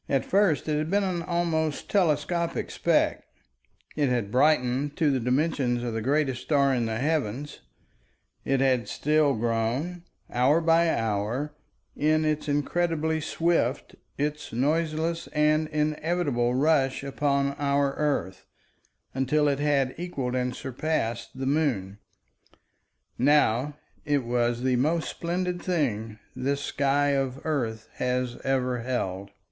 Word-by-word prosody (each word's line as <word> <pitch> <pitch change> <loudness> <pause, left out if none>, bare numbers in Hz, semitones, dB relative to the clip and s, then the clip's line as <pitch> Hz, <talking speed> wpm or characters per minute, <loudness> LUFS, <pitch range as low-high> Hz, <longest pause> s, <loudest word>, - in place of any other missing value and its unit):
At 135 -2 +1
first 195 -7 +2
it 150 -1 +1
had 155 +1 -2
been 200 +2 +2
an 180 -3 -1
almost 165 -3 -1
telescopic 170 -2 0
speck; - - +1 0.7
it 145 -3 +1
had 120 -5 -1
brightened 135 +1 +2
to 155 -3 +3
the 135 - +1
dimensions 125 -1 0
of 120 -2 -3
the 110 - -2
greatest 135 0 0
star 140 -3 +2
in 120 -3 0
the 110 0 -2
heavens; 145 -1 -2 0.8
it 135 -1 +1
had 130 -3 +2
still 150 -2 +2
grown, 120 +10 -1 0.3
hour 130 +6 +3
by 165 0 +3
hour, 115 +5 -1 0.4
in 155 +1 +2
its 155 0 -1
incredibly 160 +1 0
swift, 165 -5 0 0.2
its 150 +1 -3
noiseless 160 +5 0
and 155 +1 +2
inevitable 150 -4 0
rush 135 -2 +2
upon 140 0 0
our 140 -1 +1
earth, 140 -12 -2 0.7
until 140 +3 +1
it 140 -1 +1
had 140 -3 +1
equaled 140 -8 -3
and 125 0 -1
surpassed 125 -4 -3
the 135 - -3
moon. 130 -10 0 1.2
Now 145 0 +3 0.3
it 145 -2 +1
was 120 0 0
the 130 -1 +2
most 155 +6 +1
splendid 175 +1 -2
thing 115 - -1 0.2
this 140 +2 -1
sky 140 0 +1
of 135 -2 0
earth 115 -8 -2
has 125 -1 -1
ever 130 -2 0
held. 100 -6 -3
140 Hz, 130 wpm, -26 LUFS, 125-155 Hz, 1.2 s, to